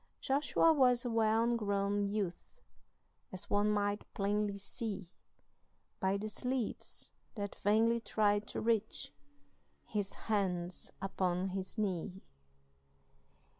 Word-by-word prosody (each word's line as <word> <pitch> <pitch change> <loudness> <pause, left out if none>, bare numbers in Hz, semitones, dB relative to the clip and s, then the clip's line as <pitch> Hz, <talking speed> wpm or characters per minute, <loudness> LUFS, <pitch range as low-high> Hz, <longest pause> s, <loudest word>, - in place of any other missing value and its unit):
Joshua 295 +4 +3
was 250 -4 +4
a 240 - -1
well 225 +1 +3
grown 200 -2 +1
youth, 200 - -3 0.7
As 185 +2 -4
one 205 +1 +3
might 205 0 0
plainly 205 0 0
see 200 -2 -4 0.9
By 190 +1 +2
the 210 +2 -3
sleeves 250 +2 -2 0.2
that 205 -2 -4
vainly 225 +3 +4
tried 210 -1 +1
to - - -4
reach 225 -1 0 0.7
His 205 -2 -2
hands 185 -5 -1
upon 185 -1 0
his 190 +3 -5
knee. 190 -2 -2
205 Hz, 105 wpm, -34 LUFS, 195-225 Hz, 0.9 s, was